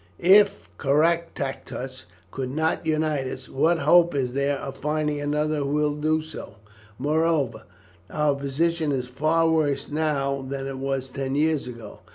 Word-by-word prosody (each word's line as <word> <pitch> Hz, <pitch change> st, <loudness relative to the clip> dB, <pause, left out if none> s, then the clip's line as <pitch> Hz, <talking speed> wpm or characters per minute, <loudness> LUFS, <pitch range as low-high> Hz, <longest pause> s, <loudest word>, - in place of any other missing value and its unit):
"If 200 Hz, +2 st, +5 dB
Caractacus 140 Hz, -4 st, -1 dB, 0.3 s
could 130 Hz, -1 st, -4 dB
not 160 Hz, +4 st, -1 dB
unite 155 Hz, -3 st, 0 dB
us, 130 Hz, 0 st, -7 dB
what 160 Hz, +5 st, +2 dB
hope 170 Hz, -1 st, +4 dB
is 125 Hz, -3 st, -1 dB
there 140 Hz, +1 st, 0 dB
of 135 Hz, 0 st, -6 dB
finding 150 Hz, 0 st, -1 dB
another 150 Hz, +1 st, 0 dB
who 140 Hz, -1 st, -1 dB, 0.2 s
would 150 Hz, -, -8 dB
do 155 Hz, +1 st, +1 dB
so? 155 Hz, -9 st, -9 dB, 0.4 s
Moreover, 155 Hz, -4 st, 0 dB, 0.4 s
our 150 Hz, -1 st, +1 dB
position 150 Hz, +3 st, 0 dB
is 130 Hz, -2 st, -1 dB
far 155 Hz, +6 st, +1 dB
worse 155 Hz, -3 st, 0 dB
now 140 Hz, -3 st, 0 dB
than 135 Hz, 0 st, -5 dB
it 135 Hz, -1 st, -5 dB
was 135 Hz, -1 st, -3 dB
ten 135 Hz, 0 st, -3 dB
years 155 Hz, -2 st, +1 dB
ago. 115 Hz, -4 st, -9 dB
145 Hz, 150 wpm, -25 LUFS, 135-160 Hz, 0.4 s, If